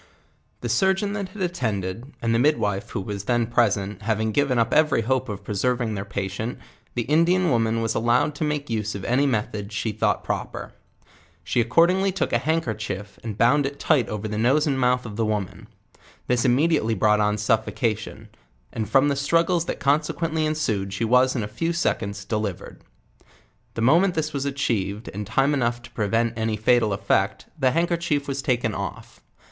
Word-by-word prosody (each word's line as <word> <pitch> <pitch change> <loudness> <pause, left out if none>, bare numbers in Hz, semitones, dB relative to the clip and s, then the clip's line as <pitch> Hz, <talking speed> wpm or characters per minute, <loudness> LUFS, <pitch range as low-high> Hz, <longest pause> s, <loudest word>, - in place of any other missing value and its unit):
The 120 - -3
surgeon 190 - +1
tint 200 -3 -4
had 190 0 -5
attended, 115 - -3
and 115 0 +1
the 115 - +3
midwife 110 -8 +1
who - - -3
was 100 0 -5
then 120 0 +2
present, 105 -4 0
having 110 0 0
given 140 +1 +1
up 115 -1 +1
every 155 -5 +3
hope 130 +2 0
of 100 -2 -6
preserving 120 +2 -1
1 100 -1 -3
iheir 100 - -18
patient, 100 +4 -3 0.4
the 120 - 0
Indian 170 +5 +3
woman 115 -1 +1
was 115 0 0
allowed 120 +6 +2
to 145 - -4
make 150 -1 -1
use 110 -2 -2
of 100 - -6
any 135 +4 +2
methods 105 -3 -2
she 110 - -1
thought 105 - 0
proper. - - -4 0.7
She 90 +8 +1
accordingly 175 - +3
took 195 - -2
a - - +3
hand 160 +1 0
kerchief, 105 - -5
and 110 -3 -5
bond 135 +5 +4
it, 140 +1 -8
tight 140 -7 +2
aver 105 0 -4
the 105 0 -3
nose 135 +7 +3
and 140 -3 0
mouth 125 0 +2
of 105 -2 -7
the 115 - +1
wo 110 -1 +1
man; 95 - -11 0.6
this 125 0 +1
immediately 130 -3 +2
brought 105 +2 +3
on 105 0 +1
suffocation; 110 0 -1 0.4
and 110 -3 -3
from 135 +4 +4
the 140 - +1
struggles 165 +4 +1
that - - -4
consequently 155 +3 0
ensjcd 110 -11 -1
she 115 +3 -1
was 125 +3 +4
in 115 - -1
a - - -3
few 140 +11 -2
seconds 100 - -2
.delivered. 105 -2 -4 0.9
The 115 - -3
moment 170 +9 +4
this 155 -1 -1
was 140 -1 -2
achieved, 115 -7 -2
and 105 0 -5
time 135 +6 +2
enough 120 -3 0
to - - -12
prevent 115 +2 0
any 110 -1 -1
fatal 110 0 +3
effect, 100 0 0
the 130 -2 +4
handkerchief 165 -1 0
was 140 0 -2
taken 120 -4 0
off. 100 -3 -6
120 Hz, 185 wpm, -24 LUFS, 105-145 Hz, 0.9 s, bond